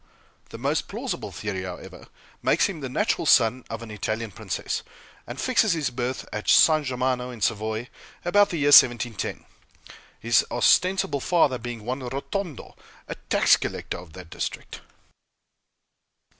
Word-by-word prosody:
The - - -9
most - - -1
plausible - - -5
theory, 95 - -4
however, 90 -1 -9 0.3
makes - - +3
him 190 -6 -6
the 135 -3 -5
natural 170 - 0
son 125 0 +4
of 115 +1 -6
an 110 - -9
Italian 110 +1 -3
princess, - - -4 0.5
and 120 +3 -7
fixes 225 -6 +2
his 150 -6 -1
birth 125 +1 -4
at 105 - -4
San 155 -1 +6
Germano, 125 -1 -1
in 120 -2 -9
Savoy, 110 +3 -1 0.4
about 205 +3 +4
the 170 - -3
year 145 -1 +2
1710; 120 -5 +4 0.7
his 115 -2 +3
ostensible 180 -5 +2
father 145 -7 +2
being 115 -2 -7
one 130 +3 -3
Rotondo, 140 - -5 0.3
a - - -4
tax - - +3
collector - - -5
of 85 -3 -14
that 90 -2 -12
district. - - -6
125 Hz, 145 wpm, -25 LUFS, 110-150 Hz, 0.7 s, San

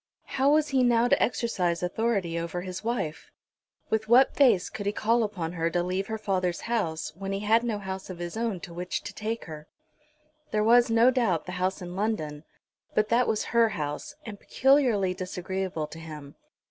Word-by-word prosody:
how 270 +2 +2
was 305 0 +3
he 270 -2 +2
now 240 -1 +4
to - - +3
exercise 180 -8 0
authority 185 -3 0
over 170 +1 -4
his 185 +1 -6
wife? 225 -10 -3 0.6
With 220 0 0
what 250 +3 +6
face 235 -10 +4
could 205 -1 -6
he - - +2
call 230 +3 +1
upon 195 -7 -2
her 165 -1 -1
to 175 +1 0
leave 185 +2 -2
her 220 - -3
father's 185 -4 -1
house, 190 -10 -2
when 195 +2 -5
he 195 0 -2
had 220 +3 +3
no 230 -3 -1
house 190 -1 -6
of 185 - -6
his 175 +2 -5
own 225 -5 -2
to 170 - -9
which 180 +2 -4
to 205 - -7
take 220 +3 -4
her? 155 -2 -9 0.8
There 210 0 +1
was, 240 +2 +5
no 230 +3 +5
doubt, 215 -11 +1
the 180 - -6
house 185 +1 -1
in 175 0 -7
London, 160 -8 -2 0.5
but 215 0 +2
that 240 +2 +3
was 215 - 0
her 230 -1 +5
house, 150 -6 -4
and 210 -3 -8
peculiarly 250 -9 +3
disagreeable 185 -2 -3
to 160 - -10
him. 150 -3 -9
195 Hz, 195 wpm, -27 LUFS, 175-230 Hz, 0.8 s, what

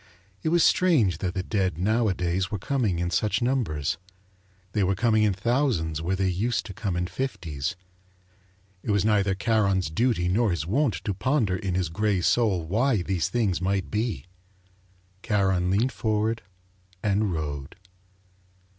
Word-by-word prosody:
It 160 - 0
was 170 0 +4
strange 120 - +3
that 90 -1 -3
the 95 - -1
dead 95 -5 -1
nowadays 95 -3 0
were 105 - -2
coming 110 -3 0
in 85 0 -1
such 105 +4 +1
numbers. 100 - -1 0.7
They 105 0 +1
were 95 +1 +1
coming 110 +1 +2
in 105 -2 +3
thousands 100 - 0
where 90 +3 0
they 95 0 0
used 105 +7 0
to 100 - -7
come 95 -1 -3
in 90 0 0
fifties. 85 - -3 1.1
It - - -7
was 100 -1 +2
neither 100 -3 +2
Charon's 100 -5 +1
duty 110 -2 +1
nor 110 +5 +2
his 85 -4 -1
wont 125 - +1
to 105 - -1
ponder 110 -1 +1
in 95 -2 -2
his 90 -3 0
grey 100 +2 0
soul 95 -4 +2
why 110 - +1
these 90 -3 -1
things 105 -7 0
might 95 0 -1
be. 105 - -2 1.0
Charon 95 -4 +1
leaned 110 +7 +2
forward 110 0 -1 0.6
and 105 0 +1
rowed. 75 -4 -4
100 Hz, 155 wpm, -26 LUFS, 90-110 Hz, 1.1 s, was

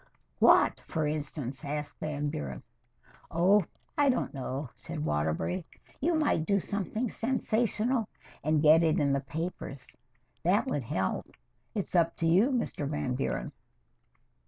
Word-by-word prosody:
"What, - - +6
for 160 -1 -2
instance?" 145 -3 -3
asked 145 0 -4
Van 150 -1 -2
Buren 65 - -5 0.7
"Oh, 185 +3 +4 0.3
I 290 -1 +4
don't 255 - 0
know," 135 -1 -4
said 75 - -5
Waterbury. 80 - 0 0.4
"You 335 +4 +2
might 300 - +2
do 200 -1 +3
something 205 +5 -2
sensational 235 -1 0 0.3
and 155 +1 +2
get 155 +2 +7
it 160 -2 +3
in 140 -2 +2
the 140 - +1
papers. 140 -3 -6 0.5
That 200 +8 +3
would 145 - -1
help. 95 -3 -1 0.5
It's 200 - -3
up 170 -2 +3
to 165 - -2
you, 185 +10 +5
Mr. 235 - -1
Van 145 -4 -1
Buren." 125 - -2
155 Hz, 135 wpm, -30 LUFS, 140-205 Hz, 0.7 s, get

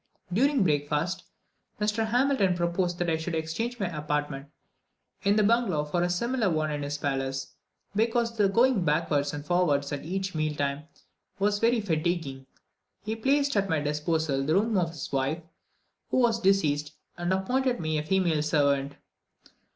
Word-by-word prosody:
During 270 +3 +3
breakfast, 155 +3 0 0.5
Mr. 210 +1 0
Hamilton 245 -6 +2
proposed 175 +1 0
that 175 - -1
I 160 -1 +1
should 165 +1 -3
exchange 165 +10 -3
my 200 - 0
apartments 150 -2 -3 0.7
in 200 +1 +3
the 215 - +4
bungalow 205 -9 +2
for 175 +4 -1
a 175 - +1
similar 235 +4 0
one 155 -2 0
in 145 0 -3
his 145 +1 -3
palace, 135 -1 -2 0.4
because 230 +1 +1
the 205 -3 +3
going 235 -1 +3
backwards 150 -2 +1
and 145 0 -6
forwards 150 -6 +1
at 145 - -4
each 190 +4 -3
meal 155 -1 -1
time 140 +1 -2 0.5
was 205 +1 +1
very 230 +1 +3
fatiguing. 160 -7 -2 0.6
He 215 +2 -2
placed 280 +4 +1
at 200 -1 +1
my 160 -3 +2
disposal 150 -1 0
the 155 +4 +1
rooms 210 0 +2
of 170 -2 0
his 160 -4 -7
wife, 140 +5 -1 0.7
who - - 0
was 230 -2 +3
deceased, 155 -7 +2 0.2
and 175 +1 -2
appointed 250 +7 +1
me 155 -1 -1
a - - -3
female 170 -2 +1
servant. 140 -2 +1
170 Hz, 160 wpm, -27 LUFS, 150-210 Hz, 0.7 s, the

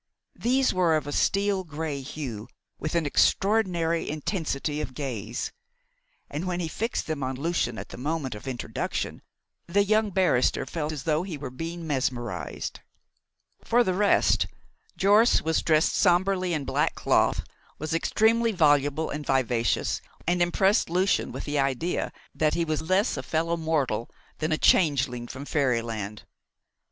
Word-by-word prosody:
These 255 +3 +2
were 175 -3 +3
of 150 - -4
a 145 - -4
steel 200 +3 +1
grey 155 -3 -4
hue, 130 -6 -6 0.3
with 155 +2 -3
an 170 -2 +2
extraordinary 175 0 +2
intensity 150 -2 -2
of 130 -4 -6
gaze; 120 -6 -4 0.8
and 155 +6 -4
when 180 -1 -1
he 170 - -1
fixed 225 +8 -2
them 155 -3 -3
on 130 0 -2
Lucian 140 -5 -1
at - - -7
the - - -9
moment 145 -1 -2
of 105 +5 -9
introduction 125 -3 -3 0.5
the 200 +4 +3
young 215 +1 +2
barrister 180 -10 +2
felt 155 -2 -3
as 150 -3 -5
though 155 -1 +1
he 180 -4 -5
were 135 -3 -6
being 165 +5 -5
mesmerised. 120 - -3 0.8
For 240 +1 +3
the 185 - 0
rest, 200 +2 +3 0.5
Jorce 205 +4 +5
was 160 0 +1
dressed 155 0 +3
sombrely 185 0 +2
in 145 -3 -3
black 135 +3 0
cloth, - - +2 0.3
was 155 +1 -4
extremely 225 +7 +2
voluble 145 -3 +2
and 150 0 -4
vivacious, 125 -4 +1 0.2
and 175 +1 +1
impressed 190 +4 +3
Lucian 185 +3 +1
with - - -6
the 145 -1 -1
idea 140 +6 0 0.2
that 155 -1 +1
he 170 - +1
was 155 -1 -1
less 190 +7 +1
a - - -2
fellow 165 +1 0
mortal 150 -9 -1 0.3
than 155 +1 -1
a 155 - +2
changeling 135 -9 +3
from 140 +3 -7
fairyland. 115 -8 -1
155 Hz, 150 wpm, -26 LUFS, 135-180 Hz, 0.8 s, Jorce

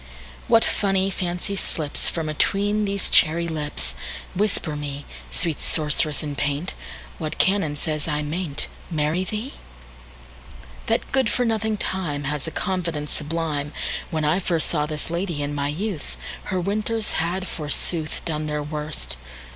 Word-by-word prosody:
What 225 - +6
funny 195 -1 +2
fancy 180 +2 -1
slipsFrom 160 -1 0
atween 205 +7 +2
these 200 -1 0
cherry 170 +1 +6
lips! 145 - -2 0.4
Whisper 190 -5 +1
me, 145 -1 -4 0.2
Sweet 165 -4 +1
sorceress 150 -1 +2
in 145 -1 -3
paint, 145 +6 0 0.5
What 155 -3 -3
canon 185 -6 +3
says 155 +1 0
I 150 -1 0
may 165 +3 -2
n'tMarry 155 +4 -2
thee? 220 +6 -3 1.3
That - - +1
good 265 -4 +4
for 245 +3 +2
nothing 220 -1 +1
TimeHas 150 -7 -1
a - - -2
confidence 170 -5 -1
sublime! 150 -2 -1 0.4
When 155 -1 0
I 155 +5 +4
firstSaw 165 -4 +1
this 155 +1 -2
lady, 170 -4 -1
in 145 0 -2
my 145 -1 0
youth, 175 +2 -3 0.3
Her 190 -2 0
winters 215 +4 0
had, 180 +3 -1
forsooth, 155 +1 -1
Done 155 -2 -1
their 150 -1 -1
worst. 150 - -3
160 Hz, 135 wpm, -24 LUFS, 150-190 Hz, 1.3 s, What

